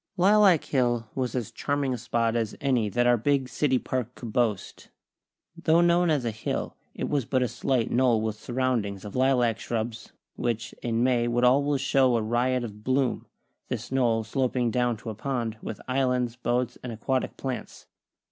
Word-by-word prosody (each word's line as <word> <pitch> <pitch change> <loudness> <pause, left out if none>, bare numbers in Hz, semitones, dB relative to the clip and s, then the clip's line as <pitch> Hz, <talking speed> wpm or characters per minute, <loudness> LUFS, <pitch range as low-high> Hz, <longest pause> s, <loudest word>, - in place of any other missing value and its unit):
Lilac 195 -2 +5
Hill 120 -4 0
was 130 -2 -2
as 120 -5 -3
charming 145 -2 -1
a - - -2
spot 115 0 0
as 115 -2 -2
any 125 -6 +1
that 120 +4 +1
our 120 0 +5
big 135 +3 +1
City 130 +2 +1
Park 125 -1 -3
could 115 -3 -8
boast. 110 -6 -1 0.7
Though 170 0 +3
known 175 0 +3
as 145 -6 +1
a 115 - 0
hill, 110 0 -4 0.2
it - - -3
was 140 -5 0
but 130 +1 +1
a - - +1
slight 125 0 -1
knoll 120 -2 +3
with 110 -1 -2
surroundings 115 -4 -2
of 105 - -8
lilac 125 -3 +2
shrubs, 115 -1 -4 0.2
which, 120 -2 -2
in 115 0 0
May 125 -2 +2
would 120 +1 0
always 140 +2 +3
show 130 -2 +3
a - - 0
riot 120 +3 +1
of 105 -2 -8
bloom; 130 0 0 0.4
this 120 -1 -5
knoll 120 -4 +2
sloping 125 0 0
down 120 -1 +1
to 110 - -6
a - - -5
pond, 115 -1 -3
with 110 - -6
islands, 125 -2 0
boats 120 0 -1
and 125 - -6
aquatic 130 +4 -2
plants. 130 -2 -6
125 Hz, 180 wpm, -26 LUFS, 115-130 Hz, 0.7 s, Lilac